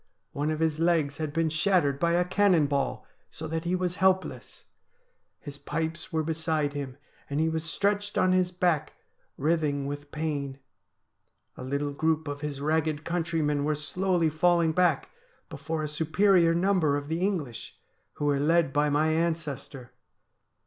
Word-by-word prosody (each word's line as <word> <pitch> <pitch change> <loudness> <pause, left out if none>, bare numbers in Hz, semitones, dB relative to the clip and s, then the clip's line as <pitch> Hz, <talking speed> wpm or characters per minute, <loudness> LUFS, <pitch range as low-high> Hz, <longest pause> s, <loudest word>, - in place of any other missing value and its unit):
One 145 +2 -2
of 155 0 -2
his 160 -1 +1
legs 165 -4 +1
had 155 -2 -3
been 165 +1 +1
shattered 160 -4 +1
by 170 +1 +2
a 175 +1 +2
cannon 185 -4 +3
ball, 140 -1 -1 0.2
so 160 - -7
that 160 +1 -3
he 175 +2 +1
was 180 -1 -2
helpless. 190 0 0 0.8
His 145 -2 -10
pipes 160 0 -4
were 160 -1 0
be 160 +1 -1
side 155 -2 -1
him, 140 -3 -5 0.3
and 140 +1 -1
he 160 +1 +2
was 160 -1 -2
stretched 205 +4 -1
on 185 - +3
his 185 -1 +2
back 175 -4 0 0.4
writhing 150 -2 0
with 145 +1 -6
pain. 145 -3 -3 1.0
A - - -8
little 140 +2 -2
group 160 +1 0
of 145 0 -5
his 145 -2 -4
ragged 155 +1 0
countrymen 160 -4 0
were 150 +1 +1
slowly 170 +2 0
falling 170 +1 +3
back 170 -3 +1 0.4
before 155 +3 -4
a - - -1
superior 165 +3 +3
number 175 -5 +2
of 145 0 -6
the 160 +2 -2
English, 170 - -3 0.4
who 145 - -4
were 145 -1 +2
led 160 -1 +2
by 150 0 +2
my 150 +2 +2
ancestor. 155 -6 -2
160 Hz, 165 wpm, -27 LUFS, 145-170 Hz, 1.0 s, cannon